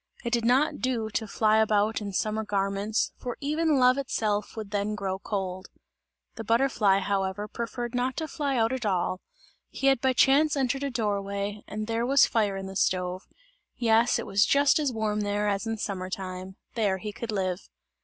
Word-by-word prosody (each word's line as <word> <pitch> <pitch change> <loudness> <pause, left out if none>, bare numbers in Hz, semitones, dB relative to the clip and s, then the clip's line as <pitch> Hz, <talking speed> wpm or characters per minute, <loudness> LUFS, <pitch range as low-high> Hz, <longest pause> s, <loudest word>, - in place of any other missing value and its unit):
It 235 -1 -3
did 235 -1 +1
not 260 +6 +3
do 235 -4 -1
to 220 +1 -2
fly 215 +1 +2
about 215 0 +2
in 200 -1 -4
summer 215 +3 -1
garments, 200 +1 -1
for 245 -1 -5
even 305 +1 +1
love 255 +1 +4
itself 215 -6 -2
would 215 -2 -6
then 205 +1 -1
grow 190 -2 -3
cold. 190 -2 -4 0.7
The 225 - -4
butterfly 225 -4 +3
however 195 +1 -1
preferred 235 +2 -5
not 250 +1 -1
to 315 - -2
fly 280 -3 -2
out 225 +1 +2
at 260 -2 -3
all; 185 -2 0 0.5
he - - -5
had 270 -3 +4
by 265 -1 +2
chance 285 +4 +4
entered 270 0 0
a 280 - -1
door 210 -5 -1
way, 200 +1 -4
and 215 0 -4
there 230 +1 -1
was 275 0 +6
fire 205 -4 0
in 195 - -5
the 190 0 -8
stove 185 0 0 0.5
yes, 230 0 +3
it - - -4
was 200 -1 +3
just 285 +2 +4
as 290 -3 0
warm 215 -2 -1
there, 205 0 0
as 200 +2 -1
in 225 0 -2
summer 190 -3 -4
time; 185 0 -6 0.2
there 205 -4 +1
he 210 +2 -6
could 230 +1 -5
live. 185 -2 -2
215 Hz, 195 wpm, -27 LUFS, 200-245 Hz, 0.7 s, was